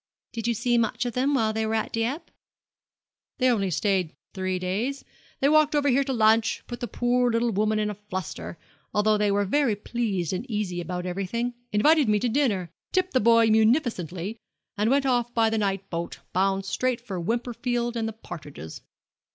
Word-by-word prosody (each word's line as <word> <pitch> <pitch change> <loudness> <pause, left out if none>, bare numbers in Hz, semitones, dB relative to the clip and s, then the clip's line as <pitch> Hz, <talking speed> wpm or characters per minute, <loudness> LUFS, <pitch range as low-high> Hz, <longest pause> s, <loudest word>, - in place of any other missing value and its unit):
'Did 230 -1 -3
you 235 - +1
see 240 +2 +2
much 230 +2 0
of 240 - -2
them 270 +4 +1
while 220 -4 +1
they 220 0 -1
were 220 0 0
at 220 - -1
Dieppe?' 235 +8 -2 1.1
'They 255 0 +3
only 200 -5 +1
stayed 185 -1 0 0.2
three 185 -1 -2
days. 205 +10 -2 0.4
They 275 - +4
walked 305 0 +4
over 285 -1 +3
here 275 +2 +3
to 270 - -2
lunch, 225 0 +3
put 240 - -7
the 240 - -3
poor 245 +1 +1
little 230 +1 +1
woman 215 +1 +1
in 210 0 0
a - - -4
fluster 190 -4 -6 0.4
although 215 +1 +3
they 210 0 +2
were 200 0 +2
very 250 +1 +2
pleasant 200 -3 -2
and - - -35
easy 205 -5 -2
about 180 0 -4
everything 195 +7 -2 0.2
invited 285 +5 +4
me 210 - +4
to 245 - 0
dinner, 215 - 0 0.2
tipped 370 0 0
the 255 - +4
boy 230 0 +5
munificently, 220 - +1 0.4
and 210 +2 +1
went 275 +1 +3
off 240 -2 +1
by 225 -1 +3
the 220 - +1
night 195 -1 -1
boat, 170 0 -4 0.2
bound 195 +1 +1
straight 250 +4 0
for 195 -7 -5
Wimperfield 240 +3 -1
and 225 -1 -1
the 225 - -4
partridges. 145 - -9
220 Hz, 190 wpm, -26 LUFS, 195-245 Hz, 1.1 s, boy